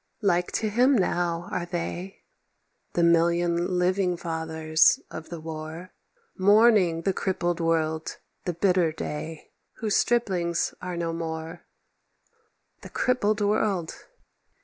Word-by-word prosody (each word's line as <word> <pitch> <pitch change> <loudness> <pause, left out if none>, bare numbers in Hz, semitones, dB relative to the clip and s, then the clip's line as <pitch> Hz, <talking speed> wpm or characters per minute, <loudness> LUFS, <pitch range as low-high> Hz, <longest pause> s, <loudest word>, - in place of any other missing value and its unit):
Like 180 -3 +2
to 220 - 0
him 250 +5 +3
now 175 -2 0
are 175 -1 -2
they, 175 +2 -5 0.7
The 170 - +1
million 170 +1 +2
living 180 0 +1
fathers 160 -1 +2
of 160 0 -8
the 170 - -6
War— 160 +2 -7 0.5
Mourning 200 -4 +4
the 195 - +1
crippled 175 -2 -1
world, 160 -1 -1 0.3
the 180 - -1
bitter 180 -1 +2
day— 155 0 -6 0.2
Whose 215 -3 -2
striplings 185 -8 +1
are 180 -1 -5
no 165 -1 -2
more. 160 -1 -5 1.2
The - - -10
crippled 215 -4 +1
world! 205 -5 0
175 Hz, 115 wpm, -26 LUFS, 165-190 Hz, 1.2 s, Mourning